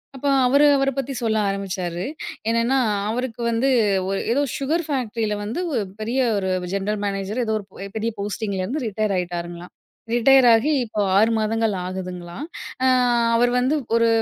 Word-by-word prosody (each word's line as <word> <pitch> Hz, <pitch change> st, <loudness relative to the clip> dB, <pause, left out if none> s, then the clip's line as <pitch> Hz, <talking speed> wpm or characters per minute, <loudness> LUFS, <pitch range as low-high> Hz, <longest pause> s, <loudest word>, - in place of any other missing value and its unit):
அப்போ 280 Hz, +2 st, -1 dB, 0.2 s
அவரு 280 Hz, +3 st, +5 dB
அவர 275 Hz, 0 st, +2 dB
பத்தி 275 Hz, 0 st, -2 dB
சொல்ல 220 Hz, -1 st, +1 dB
ஆரம்பிச்சாரு. 185 Hz, -3 st, -3 dB, 0.5 s
என்னென்னா 230 Hz, +3 st, +2 dB, 0.3 s
அவருக்கு 240 Hz, 0 st, -3 dB
வந்து 235 Hz, +4 st, +1 dB, 0.4 s
ஒரு 195 Hz, -, -1 dB
ஏதோ, 280 Hz, -, +2 dB, 0.2 s
சுகர் 310 Hz, +5 st, 0 dB
ஃபேக்ட்ரில 230 Hz, -6 st, -1 dB
வந்து 225 Hz, +11 st, -4 dB
ஒரு 230 Hz, -, +1 dB, 0.2 s
பெரிய 235 Hz, +5 st, -1 dB, 0.2 s
ஒரு 190 Hz, -1 st, -1 dB, 0.2 s
ஜென்ட்ரல் 200 Hz, +2 st, -1 dB
மேனேஜர் 200 Hz, +4 st, -2 dB
ஏதோ, 220 Hz, -, -1 dB
ஒரு 200 Hz, -, -10 dB, 0.3 s
பெரிய 225 Hz, +1 st, -1 dB
போஸ்ட்டிங்கலேருந்து, 205 Hz, +5 st, -3 dB
ரிட்டயர் 215 Hz, 0 st, -1 dB
ஆயிட்டாருங்களாம். 175 Hz, -1 st, -5 dB, 0.4 s
ரிட்டயர் 255 Hz, +2 st, +5 dB
ஆகி 235 Hz, +8 st, +3 dB
இப்போ 215 Hz, -1 st, -3 dB, 0.2 s
6 220 Hz, +2 st, +4 dB
மாதங்கள் 220 Hz, 0 st, 0 dB
ஆகுதுங்களாம். 180 Hz, -, -6 dB, 0.4 s
அ -, -, +5 dB, 0.5 s
அவரு 245 Hz, +1 st, +3 dB
வந்து 260 Hz, +5 st, +1 dB, 0.2 s
ஒரு 230 Hz, 0 st, +4 dB
220 Hz, 150 wpm, -22 LUFS, 195-250 Hz, 0.5 s, அவரு